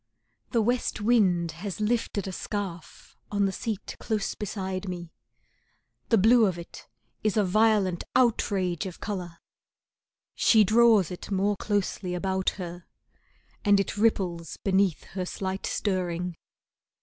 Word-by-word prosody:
The 230 Hz, -3 st, +2 dB
west 245 Hz, +2 st, 0 dB
wind 195 Hz, -7 st, +3 dB
has 185 Hz, +5 st, -6 dB
lifted 215 Hz, -2 st, -1 dB
a -, -, -3 dB
scarf 185 Hz, -3 st, -6 dB, 0.2 s
On 205 Hz, -1 st, +2 dB
the 195 Hz, -, +1 dB
seat 210 Hz, +1 st, -4 dB
close 215 Hz, -3 st, -1 dB
beside 190 Hz, -2 st, -4 dB
me, 175 Hz, -2 st, -6 dB, 1.0 s
the 225 Hz, -, +5 dB
blue 225 Hz, +2 st, +6 dB
of 180 Hz, -3 st, -2 dB
it 170 Hz, -, -10 dB, 0.4 s
is 215 Hz, 0 st, +1 dB
a 210 Hz, -, +4 dB
violent 200 Hz, -2 st, +2 dB
outrage 200 Hz, -8 st, +1 dB
of 180 Hz, -, -9 dB
colour. 180 Hz, -5 st, -5 dB, 1.0 s
She 220 Hz, -2 st, +5 dB
draws 220 Hz, -3 st, +5 dB
it 180 Hz, -, -7 dB
more 200 Hz, +1 st, +1 dB
closely 200 Hz, -2 st, -2 dB
about 190 Hz, +1 st, 0 dB
her, 175 Hz, -2 st, -7 dB, 0.8 s
and 205 Hz, -2 st, +5 dB
it 195 Hz, -, -1 dB
ripples 185 Hz, -6 st, 0 dB
beneath 190 Hz, -4 st, +2 dB
her 185 Hz, 0 st, -5 dB
slight 190 Hz, +1 st, -4 dB
stirring. 180 Hz, -3 st, -1 dB
195 Hz, 130 wpm, -27 LUFS, 180-215 Hz, 1.0 s, blue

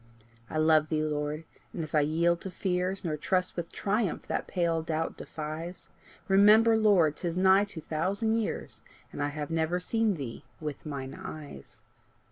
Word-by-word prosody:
I -, -, -3 dB
love 155 Hz, 0 st, +4 dB
thee, 155 Hz, -1 st, +1 dB
Lord; 150 Hz, 0 st, -2 dB, 0.3 s
and 165 Hz, -, -3 dB
if 155 Hz, -, -8 dB
I 155 Hz, -, +5 dB
yield 170 Hz, +3 st, +2 dB
to 190 Hz, -, -5 dB
fears, 185 Hz, 0 st, -1 dB
Nor 155 Hz, -2 st, -1 dB
trust 185 Hz, +4 st, 0 dB
with 170 Hz, -1 st, -4 dB
triumph 205 Hz, -2 st, -1 dB
that -, -, -2 dB
pale 170 Hz, -2 st, 0 dB
doubt 160 Hz, 0 st, -2 dB
defies, 160 Hz, +3 st, -7 dB, 0.4 s
Remember, 210 Hz, +4 st, +6 dB
Lord, 195 Hz, -9 st, +4 dB
'tis 170 Hz, -1 st, -3 dB
nigh 190 Hz, +2 st, +5 dB
two 190 Hz, -5 st, -8 dB
thousand 190 Hz, +9 st, 0 dB
years, 215 Hz, -, -4 dB, 0.3 s
And -, -, -5 dB
I 145 Hz, -, +1 dB
have 150 Hz, +2 st, -5 dB
never 165 Hz, +2 st, +1 dB
seen 220 Hz, +2 st, +1 dB
thee 130 Hz, -7 st, -6 dB, 0.2 s
with 150 Hz, -1 st, -6 dB
mine 135 Hz, -2 st, -5 dB
eyes. 145 Hz, -, -9 dB
165 Hz, 165 wpm, -29 LUFS, 155-190 Hz, 0.4 s, Remember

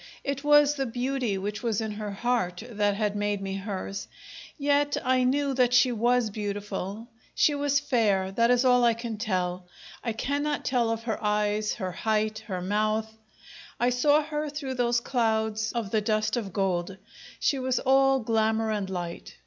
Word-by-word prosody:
It 275 Hz, 0 st, -3 dB
was 295 Hz, 0 st, +5 dB
the 270 Hz, -2 st, -2 dB
beauty 245 Hz, -3 st, -1 dB
which 205 Hz, +2 st, -4 dB
was 230 Hz, -4 st, 0 dB
in 220 Hz, -1 st, -3 dB
her 210 Hz, 0 st, -5 dB
heart 200 Hz, -4 st, -1 dB
that 205 Hz, -3 st, 0 dB
had 210 Hz, -1 st, -1 dB
made 205 Hz, 0 st, -1 dB
me 195 Hz, 0 st, -4 dB
hers; 195 Hz, 0 st, -5 dB, 0.5 s
yet 285 Hz, 0 st, +2 dB
I 255 Hz, 0 st, +3 dB
knew 275 Hz, +2 st, +1 dB
that 250 Hz, -1 st, +3 dB
she 250 Hz, 0 st, +5 dB
was 240 Hz, 0 st, +1 dB
beautiful. 205 Hz, +1 st, -4 dB, 0.3 s
She 300 Hz, -, +4 dB
was 285 Hz, 0 st, +1 dB
fair, 215 Hz, -9 st, +1 dB
that 230 Hz, +4 st, +2 dB
is 250 Hz, +1 st, +3 dB
all 250 Hz, -1 st, +5 dB
I 235 Hz, -1 st, +4 dB
can 230 Hz, -1 st, -5 dB
tell. 180 Hz, -3 st, -2 dB, 0.4 s
I 230 Hz, -, -1 dB
cannot 285 Hz, +5 st, -2 dB
tell 240 Hz, -3 st, +1 dB
of 225 Hz, 0 st, -2 dB
her 225 Hz, -2 st, -3 dB
eyes, 210 Hz, 0 st, 0 dB
her 185 Hz, -4 st, -4 dB
height, 215 Hz, +2 st, -1 dB
her 185 Hz, -4 st, -3 dB
mouth; 215 Hz, +3 st, 0 dB, 0.6 s
I 245 Hz, +1 st, +2 dB
saw 290 Hz, +5 st, +3 dB
her 300 Hz, 0 st, -3 dB
through 285 Hz, -2 st, -4 dB
those 240 Hz, -1 st, +1 dB
clouds 220 Hz, -3 st, 0 dB
of 230 Hz, -5 st, -3 dB
the 220 Hz, -, +2 dB
dust 215 Hz, +1 st, 0 dB
of 215 Hz, -5 st, -3 dB
gold 185 Hz, -1 st, -1 dB, 0.4 s
she 275 Hz, -, +1 dB
was 255 Hz, -1 st, 0 dB
all 270 Hz, 0 st, +3 dB
glamour 220 Hz, 0 st, +1 dB
and 205 Hz, -3 st, -2 dB
light. 175 Hz, -2 st, -6 dB
225 Hz, 175 wpm, -27 LUFS, 205-255 Hz, 0.6 s, was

